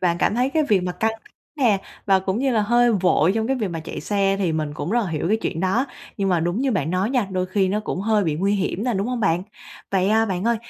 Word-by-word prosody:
Bạn 175 -2 +1
cảm 210 - +1
thấy 250 +2 +1
cái 315 +1 +2
việc 205 -3 +4
mà 180 0 -2
căng 220 +5 0
th - - -19 0.3
nè, 220 -7 +4 0.3
và 195 -1 +5
cũng 190 +2 -2
như 270 +1 +1
là 225 -3 +2
hơi 240 +2 +3
vội 185 -3 +3
trong 220 0 0
cái 265 +2 0
việc 215 -5 -2
mà 165 -2 -4
chạy 160 - -7
xe 195 -1 +1
thì 180 -5 0
mình 155 -2 -2
cũng 150 +3 -4
rất 240 +3 +2
là 185 - -4
hiểu 160 +2 -2
cái 220 - +3
chuyện 165 - -2
đó. 195 +9 +1 0.3
Nhưng 195 -2 0
mà 175 -2 +2
đúng 175 +5 -1
như 270 0 +1
bạn 185 -6 -1
nói 185 +5 0
nha, 250 -6 +1
đôi 185 -1 -1
khi 190 0 +1
nó 205 +3 0
cũng 190 - -4
hơi 210 0 +2
bị 155 -3 0
nguy 195 +5 +1
hiểm 195 +2 -2
nè, 245 - 0
đúng 195 +3 -1
hông 250 -1 -2
bạn? 175 -3 +1 0.5
Vậy, 190 -1 +2
à, 220 +1 +3
bạn 185 -2 -2
ơi, 235 0 +2
195 Hz, 295 wpm, -22 LUFS, 180-225 Hz, 0.5 s, và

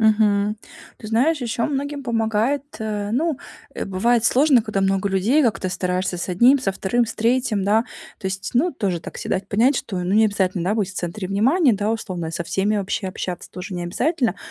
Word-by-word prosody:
Мгм. 210 -1 +3 0.4
Ты 215 - -8
знаешь, 275 +8 +2
еще 235 -1 -1
многим 285 0 -3
помогает, 230 +3 0 0.2
э, 210 -2 -3
ну 300 +6 0 0.4
э, - - -3
бывает 225 +5 +1
сложно, 260 0 +4
когда 215 -3 -2
много 195 0 +1
людей. 205 +11 +2
Как-то 215 -6 0
стараешься 180 0 -1
с 175 - -4
1, 240 +10 +5
со 225 - 0
2, 200 +5 0
с 230 - -6
3, 230 -3 +1
да. 215 +3 +3 0.4
То 195 - -4
есть, 190 0 -5
ну 305 +9 +3
тоже 190 -9 -2
так - - -9
се - - -6
дать 190 +1 -1
понять, 240 +7 +3
что, 190 -6 -3
ну, 180 +2 -2
не 220 +1 +5
обязательно, 190 -3 0
да, 190 +4 0
быть 200 -4 0
в - - -13
центре 185 +2 -4
внимания, 250 - +3
да, 205 +1 0
условно, 185 -7 -3
со 170 +1 -4
всеми 200 +5 0
вообще 200 0 -2
общаться 180 -1 -5
тоже 185 +1 -7
не 175 - -3
обязательно. 245 - 0
210 Hz, 205 wpm, -22 LUFS, 190-240 Hz, 0.4 s, 1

